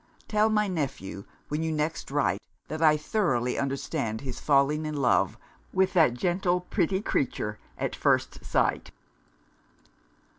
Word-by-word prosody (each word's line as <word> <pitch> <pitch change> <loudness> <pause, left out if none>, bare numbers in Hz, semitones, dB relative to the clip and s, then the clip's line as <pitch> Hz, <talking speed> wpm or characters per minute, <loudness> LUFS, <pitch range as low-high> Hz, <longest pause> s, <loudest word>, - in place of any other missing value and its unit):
Tell 215 0 +3
my 210 -1 +2
nephew, 135 - -4 0.2
when 150 +2 -1
you 160 0 -1
next 155 +1 -2
write, 135 -9 +1 0.3
that 155 +1 -4
I 155 -1 +6
thoroughly 150 - 0
understand 135 -4 -2
his 130 -3 -6
falling 145 +2 +3
in 155 - -3
love 120 -8 +2 0.4
with 190 0 +2
that 160 -9 +4
gentle 180 +5 +1
pretty 190 +1 0
creature 105 - -1 0.2
at - - -2
first - - +1
sight." - - +1
150 Hz, 135 wpm, -27 LUFS, 135-180 Hz, 0.4 s, I